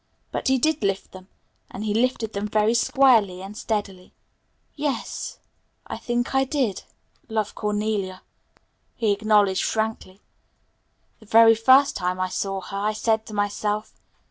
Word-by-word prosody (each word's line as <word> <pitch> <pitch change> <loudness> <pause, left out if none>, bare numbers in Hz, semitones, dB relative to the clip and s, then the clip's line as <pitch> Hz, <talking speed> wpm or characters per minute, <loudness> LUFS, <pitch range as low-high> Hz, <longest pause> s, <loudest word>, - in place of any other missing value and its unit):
But - - -3
he 265 0 +4
did 310 +4 +1
lift 195 -1 -2
them 185 0 -12 0.4
and 200 - -7
he 210 - 0
lifted 230 -1 0
them 200 +1 -3
very 215 +1 +2
squarely 230 -7 +3
and 195 +2 -9
steadily. 205 -4 -4 0.6
"Yes, 290 -5 -4 0.5
I - - -6
think 240 +1 -2
I 265 0 +3
did 260 -7 -1 0.5
love 215 -2 -2
Cornelia," 210 -3 -2 0.7
he 220 -3 +1
acknowledged 205 -2 +2
frankly. 220 -3 -3 1.0
"The 220 - -18
very 225 +1 +7
first 260 +5 +5
time 180 0 -2
that 185 - -1
I 185 - -2
saw 195 +1 -3
her 195 +2 -7
I 210 +2 0
said 220 0 0
to 215 - -8
myself. 205 +1 -2
215 Hz, 145 wpm, -24 LUFS, 200-230 Hz, 1.0 s, very